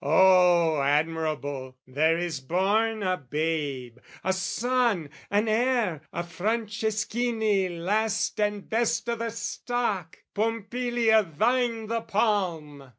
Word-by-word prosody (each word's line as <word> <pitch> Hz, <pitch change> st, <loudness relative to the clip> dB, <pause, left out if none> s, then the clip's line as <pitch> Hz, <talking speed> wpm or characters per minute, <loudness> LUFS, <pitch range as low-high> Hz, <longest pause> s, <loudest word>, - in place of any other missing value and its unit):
O 170 Hz, -1 st, +5 dB
admirable, 145 Hz, -3 st, -1 dB
there 155 Hz, +5 st, +2 dB
is 170 Hz, -4 st, -3 dB
born 205 Hz, +9 st, 0 dB
a 185 Hz, -1 st, +1 dB
babe, 145 Hz, -4 st, -3 dB, 0.2 s
A 190 Hz, -, +1 dB
son, 220 Hz, -, 0 dB, 0.2 s
an 205 Hz, +2 st, +1 dB
heir, 220 Hz, -, +1 dB
a 170 Hz, -, -3 dB
Franceschini 215 Hz, +1 st, -1 dB
last 200 Hz, +7 st, -1 dB
And 205 Hz, -1 st, -1 dB
best 230 Hz, 0 st, 0 dB
o' 235 Hz, -, 0 dB
the 230 Hz, 0 st, -3 dB
stock! 225 Hz, -5 st, -3 dB, 0.2 s
Pompilia, 225 Hz, +1 st, +1 dB
thine 230 Hz, -, 0 dB
the 230 Hz, +1 st, -2 dB
palm! 175 Hz, -, -1 dB
195 Hz, 105 wpm, -26 LUFS, 160-225 Hz, 0.2 s, O